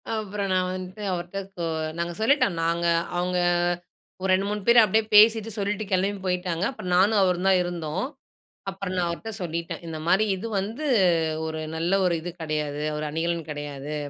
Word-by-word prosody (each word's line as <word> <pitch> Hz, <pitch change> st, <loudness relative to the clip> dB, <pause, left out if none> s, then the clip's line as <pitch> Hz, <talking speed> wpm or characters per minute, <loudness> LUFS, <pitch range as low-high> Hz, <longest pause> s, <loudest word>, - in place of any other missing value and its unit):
அப்புறம் 205 Hz, -2 st, -3 dB
நான் 185 Hz, 0 st, +1 dB
வந்துட்டு 185 Hz, +3 st, -7 dB
அவர்ட்ட 175 Hz, +2 st, -4 dB, 0.2 s
கொ 170 Hz, -, -2 dB, 0.3 s
நாங்க 170 Hz, 0 st, -2 dB
சொல்லிட்டோம், 220 Hz, -, +3 dB
நாங்க 170 Hz, +1 st, 0 dB, 0.3 s
அவுங்க 180 Hz, 0 st, 0 dB, 0.8 s
ஒரு 190 Hz, -, -1 dB
2, 195 Hz, +2 st, +1 dB
3 210 Hz, 0 st, -2 dB
பேர் 235 Hz, 0 st, +8 dB
அப்படியே 220 Hz, +2 st, +3 dB
பேசிட்டு, 220 Hz, +1 st, +6 dB
சொல்லிட்டு 205 Hz, +1 st, -1 dB
கிளம்பி 195 Hz, +2 st, +1 dB
போயிட்டாங்க. 180 Hz, -1 st, -1 dB
அப்புறம் 180 Hz, -9 st, -4 dB
நானும் 205 Hz, +3 st, +4 dB
அவரும் 180 Hz, +1 st, +1 dB
தான் 185 Hz, -1 st, +5 dB
இருந்தோம். 175 Hz, +2 st, -3 dB, 0.7 s
அப்புறம் 190 Hz, -1 st, -5 dB
நான் 175 Hz, -1 st, +1 dB
அவர்ட்ட 210 Hz, +6 st, -5 dB
சொல்லிட்டேன், 170 Hz, 0 st, -4 dB
இந்த 160 Hz, -1 st, -5 dB
மாரி 195 Hz, +5 st, +4 dB
"இது 215 Hz, +5 st, -6 dB
வந்து 225 Hz, +10 st, -4 dB, 0.6 s
ஒரு 160 Hz, 0 st, -4 dB, 0.2 s
நல்ல 170 Hz, +3 st, -1 dB
ஒரு 175 Hz, -, +2 dB
இது 175 Hz, +2 st, -5 dB
கிடையாது, 150 Hz, -1 st, -2 dB
ஒரு 155 Hz, -, -3 dB
அணிகலன் 165 Hz, 0 st, -2 dB
கிடையாது. 145 Hz, 0 st, -5 dB
180 Hz, 165 wpm, -25 LUFS, 170-200 Hz, 0.8 s, பேர்